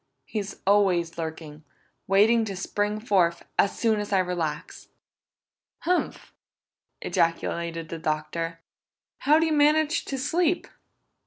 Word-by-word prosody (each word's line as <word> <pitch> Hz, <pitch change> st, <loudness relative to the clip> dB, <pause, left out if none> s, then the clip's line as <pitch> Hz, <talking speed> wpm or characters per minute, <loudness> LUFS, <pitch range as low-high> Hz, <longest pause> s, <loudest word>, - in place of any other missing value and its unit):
He's 205 Hz, -2 st, -4 dB
always 190 Hz, -4 st, +3 dB
lurking, 160 Hz, -1 st, -6 dB, 0.4 s
waiting 215 Hz, +4 st, +4 dB
to 200 Hz, -2 st, -5 dB
spring 205 Hz, +2 st, -2 dB
forth, 185 Hz, -7 st, +1 dB
as 200 Hz, -, +2 dB
soon 220 Hz, -2 st, +2 dB
as 205 Hz, 0 st, -5 dB
I 195 Hz, -, +3 dB
relax!" 175 Hz, -5 st, -3 dB, 0.9 s
"Humph!" 360 Hz, +2 st, -1 dB, 0.7 s
ejaculated 165 Hz, 0 st, -1 dB
the 165 Hz, -, -5 dB
Doctor. 165 Hz, +1 st, -3 dB, 0.6 s
"How 300 Hz, +2 st, +4 dB
do 325 Hz, -, +3 dB
you 320 Hz, -, +1 dB
manage 305 Hz, +2 st, +3 dB
to 270 Hz, -, -4 dB
sleep?" 330 Hz, +6 st, 0 dB
195 Hz, 115 wpm, -26 LUFS, 165-235 Hz, 0.9 s, waiting